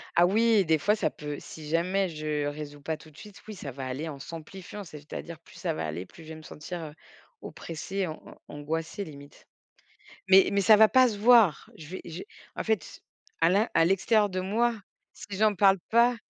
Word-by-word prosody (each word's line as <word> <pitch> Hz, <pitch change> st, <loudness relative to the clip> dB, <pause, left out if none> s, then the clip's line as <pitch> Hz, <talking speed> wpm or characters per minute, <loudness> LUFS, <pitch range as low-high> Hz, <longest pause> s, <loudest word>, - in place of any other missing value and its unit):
Ah 175 Hz, +1 st, +6 dB
oui, 220 Hz, 0 st, +4 dB
des 160 Hz, -1 st, +3 dB
fois 205 Hz, +8 st, +2 dB
ça -, -, 0 dB
peut 150 Hz, -1 st, -7 dB
si 155 Hz, -1 st, -10 dB
jamais 185 Hz, +4 st, +1 dB
je 155 Hz, -2 st, -3 dB
résous 145 Hz, 0 st, -6 dB
pas 160 Hz, +1 st, -3 dB
tout 155 Hz, -, -16 dB
de 150 Hz, -, -21 dB
suite, 210 Hz, -2 st, -13 dB
oui 215 Hz, -, -7 dB
ça 140 Hz, -6 st, -7 dB
va 130 Hz, 0 st, -6 dB
aller 145 Hz, +6 st, -4 dB
en 140 Hz, -2 st, -8 dB
s'amplifiant, 180 Hz, +6 st, -9 dB
c'est-à-dire 155 Hz, +1 st, -9 dB
plus -, -, -19 dB
ça 165 Hz, -3 st, -2 dB
va 80 Hz, -, -3 dB
aller, 85 Hz, +4 st, -5 dB
plus 165 Hz, -, -15 dB
je 160 Hz, -, -13 dB
vais 160 Hz, -, -7 dB
me 155 Hz, -, -12 dB
sentir, 165 Hz, +4 st, -7 dB
heu, 150 Hz, -1 st, -8 dB, 0.5 s
oppressée, 185 Hz, +4 st, -5 dB
an 155 Hz, -2 st, -7 dB
an -, -, -13 dB
angoissée 160 Hz, +6 st, -4 dB
limite. 145 Hz, -1 st, -13 dB, 0.8 s
Mais 190 Hz, 0 st, +7 dB
mais 200 Hz, -, +3 dB
ça 210 Hz, +2 st, +7 dB
va 220 Hz, 0 st, +8 dB
pas 255 Hz, 0 st, +5 dB
se 210 Hz, -, -5 dB
voir. 220 Hz, -, +5 dB
Je 155 Hz, -, -11 dB
v -, -, -9 dB
j'ai 165 Hz, -, -7 dB, 0.3 s
en -, -, -3 dB
fait, 220 Hz, -8 st, -2 dB, 0.4 s
à 165 Hz, -, +5 dB
l'in 205 Hz, +5 st, +3 dB
à 165 Hz, -, +5 dB
l'extérieur 200 Hz, +4 st, +3 dB
de 185 Hz, -, -3 dB
moi, 225 Hz, +6 st, +1 dB, 0.4 s
si -, -, -12 dB
j'en 215 Hz, -1 st, +3 dB
parle 195 Hz, 0 st, +5 dB
pas 235 Hz, +2 st, +4 dB
170 Hz, 215 wpm, -28 LUFS, 155-205 Hz, 0.8 s, va